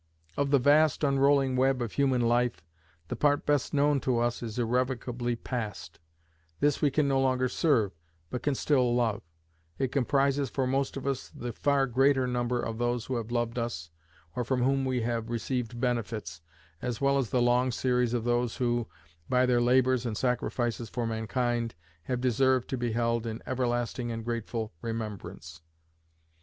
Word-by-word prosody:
Of 140 Hz, 0 st, 0 dB
the 140 Hz, -, +5 dB
vast 145 Hz, +3 st, +4 dB
unrolling 140 Hz, -1 st, +3 dB
web 130 Hz, 0 st, +2 dB
of 120 Hz, -3 st, -3 dB
human 135 Hz, -3 st, +2 dB
life, 120 Hz, -5 st, +1 dB, 0.5 s
the -, -, -2 dB
part 145 Hz, -1 st, +2 dB
best 145 Hz, -2 st, +1 dB
known 145 Hz, -1 st, +3 dB
to 130 Hz, -2 st, 0 dB
us 120 Hz, 0 st, 0 dB
is 115 Hz, -2 st, -5 dB
irrevocably 120 Hz, 0 st, -1 dB
past; 110 Hz, -8 st, -5 dB, 0.6 s
this 145 Hz, -1 st, +2 dB
we 145 Hz, -, +4 dB
can 145 Hz, +1 st, +1 dB
no 135 Hz, -1 st, +2 dB
longer 130 Hz, -1 st, +2 dB
serve, 125 Hz, -, +2 dB, 0.4 s
but 125 Hz, -, -3 dB
can 145 Hz, 0 st, 0 dB
still 125 Hz, -4 st, +2 dB
love: 115 Hz, -4 st, +1 dB, 0.6 s
it 130 Hz, -2 st, -1 dB
comprises 140 Hz, 0 st, +1 dB
for 135 Hz, +1 st, -1 dB
most 135 Hz, +2 st, -1 dB
of 135 Hz, -, -6 dB
us 135 Hz, -2 st, -2 dB
the 120 Hz, -1 st, -6 dB
far 140 Hz, +2 st, +2 dB
greater 135 Hz, +1 st, +3 dB
number 125 Hz, 0 st, -1 dB
of 115 Hz, -1 st, -4 dB
those 120 Hz, -1 st, 0 dB
who 130 Hz, -, -3 dB
have 115 Hz, -1 st, -4 dB
loved 120 Hz, 0 st, -1 dB
us, 85 Hz, -9 st, -4 dB, 0.4 s
or 125 Hz, -, -1 dB
from 125 Hz, +1 st, 0 dB
whom 135 Hz, +1 st, +2 dB
we 130 Hz, -2 st, 0 dB
have 115 Hz, 0 st, -2 dB
received 120 Hz, 0 st, -3 dB
benefits, 110 Hz, -9 st, -2 dB, 0.4 s
as 120 Hz, -2 st, -3 dB
well 140 Hz, 0 st, +3 dB
as 125 Hz, -5 st, -1 dB
the 125 Hz, -, +1 dB
long 120 Hz, +1 st, +3 dB
series 125 Hz, -1 st, +1 dB
of 115 Hz, -, -1 dB
those 120 Hz, 0 st, 0 dB
who, 120 Hz, -2 st, 0 dB, 0.4 s
by 125 Hz, 0 st, +4 dB
their 125 Hz, -1 st, +3 dB
labours 130 Hz, 0 st, +3 dB
and 115 Hz, -4 st, -3 dB
sacrifices 120 Hz, -2 st, -1 dB
for 120 Hz, +2 st, -2 dB
mankind, 115 Hz, +1 st, -1 dB, 0.3 s
have 125 Hz, -1 st, -1 dB
deserved 130 Hz, +1 st, +2 dB
to -, -, -2 dB
be 120 Hz, -2 st, -2 dB
held 115 Hz, 0 st, 0 dB
in 110 Hz, 0 st, -4 dB
everlasting 120 Hz, -1 st, -1 dB
and 115 Hz, -1 st, -5 dB
grateful 115 Hz, -2 st, -3 dB
remembrance. 105 Hz, -8 st, -6 dB
125 Hz, 175 wpm, -29 LUFS, 115-130 Hz, 0.6 s, the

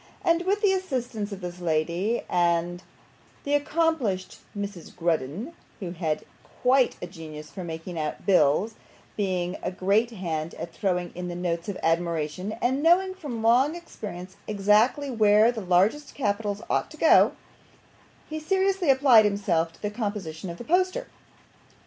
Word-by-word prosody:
And 340 Hz, +2 st, +2 dB
with 410 Hz, +2 st, +1 dB
the 395 Hz, -2 st, +5 dB
assistance 245 Hz, -, -3 dB
of 200 Hz, -1 st, -7 dB
this 180 Hz, 0 st, -6 dB
lady, 175 Hz, +6 st, 0 dB
and 175 Hz, 0 st, +1 dB, 0.6 s
the 285 Hz, -, -1 dB
accomplished 290 Hz, -, 0 dB, 0.2 s
Mrs. 200 Hz, -4 st, -6 dB
Grudden 170 Hz, -, -2 dB, 0.3 s
(who 180 Hz, -4 st, -5 dB
had 160 Hz, -3 st, -2 dB, 0.4 s
quite 255 Hz, 0 st, +4 dB
a -, -, -1 dB
genius 155 Hz, -4 st, -10 dB
for 190 Hz, -, -7 dB
making 165 Hz, +1 st, -6 dB
out 155 Hz, +2 st, -4 dB
bills, 185 Hz, +3 st, +3 dB, 0.4 s
being 185 Hz, -3 st, -1 dB
a -, -, -2 dB
great 200 Hz, +5 st, +1 dB
hand 165 Hz, -7 st, -4 dB
at 170 Hz, -, -7 dB
throwing 180 Hz, -3 st, -1 dB
in 180 Hz, 0 st, -5 dB
the 175 Hz, -, -5 dB
notes 175 Hz, 0 st, -2 dB
of 195 Hz, -, -4 dB
admiration, 165 Hz, +3 st, -1 dB
and 260 Hz, +3 st, +1 dB
knowing 365 Hz, +4 st, +4 dB
from 285 Hz, -12 st, -6 dB
long 255 Hz, +7 st, +4 dB
experience 195 Hz, -, -8 dB
exactly 215 Hz, +7 st, +2 dB
where 215 Hz, 0 st, +5 dB
the 230 Hz, -3 st, -5 dB
largest 195 Hz, +11 st, +1 dB
capitals 205 Hz, -3 st, -1 dB
ought -, -, 0 dB
to -, -, -12 dB
go), -, -, +6 dB, 0.9 s
he 310 Hz, 0 st, -4 dB
seriously 380 Hz, +1 st, +1 dB
applied 260 Hz, -5 st, +6 dB
himself 190 Hz, -5 st, +1 dB
to -, -, -22 dB
the 210 Hz, -, -1 dB
composition 200 Hz, -6 st, -4 dB
of 170 Hz, -, -7 dB
the -, -, -8 dB
poster. 370 Hz, -, +1 dB
205 Hz, 150 wpm, -26 LUFS, 175-260 Hz, 0.9 s, go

